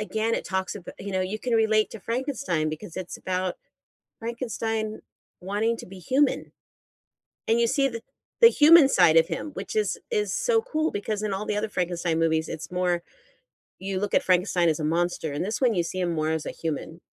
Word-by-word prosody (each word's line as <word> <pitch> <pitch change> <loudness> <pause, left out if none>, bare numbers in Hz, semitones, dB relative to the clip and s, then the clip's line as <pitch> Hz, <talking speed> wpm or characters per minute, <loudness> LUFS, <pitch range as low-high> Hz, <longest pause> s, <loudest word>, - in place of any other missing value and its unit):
again, 220 +1 -1
it - - -3
talks 190 0 -2
abo 180 - -9
you 200 0 -6
know, 185 - 0
you 190 +4 -2
can 245 +2 -3
relate 220 -1 +3
to 225 - -9
Frankenstein 230 - -1
because 155 +1 -8
it's 185 -2 -6
about 185 -1 -2 0.6
Frankenstein 225 -2 -3 0.4
wanting 210 +5 0
to - - -9
be 190 0 -11
human. 265 - +1 1.0
And 225 - +3
you 235 - +4
see 275 +3 +2
the 230 -3 -6 0.4
the 460 - +10
human 310 - +7
side 175 - +5
of 165 0 +5
him, 300 - -4
which - - -6
is 430 -1 0
is 425 -3 0
so 485 -2 +2
cool 315 +1 -1
because 205 +1 -3
in 210 -2 -1
all 195 +2 -3
the 210 - -1
other 215 +1 -1
Frankenstein 175 -3 -1
movies, 160 -1 +1
it's 160 - -6
more 180 -1 0 0.8
you 190 0 -3
look 205 +1 -2
at - - +4
Frankenstein 180 -1 +2
as 155 - +1
a 150 - -2
monster, 165 -1 0
in 145 - -2
this 210 +4 -2
one, 250 -4 +3
you 175 - +2
see 185 +2 -5
him 175 -2 0
more 155 0 0
as 160 -1 -2
a - - -3
human. 160 +1 -5
200 Hz, 205 wpm, -26 LUFS, 175-230 Hz, 1.0 s, the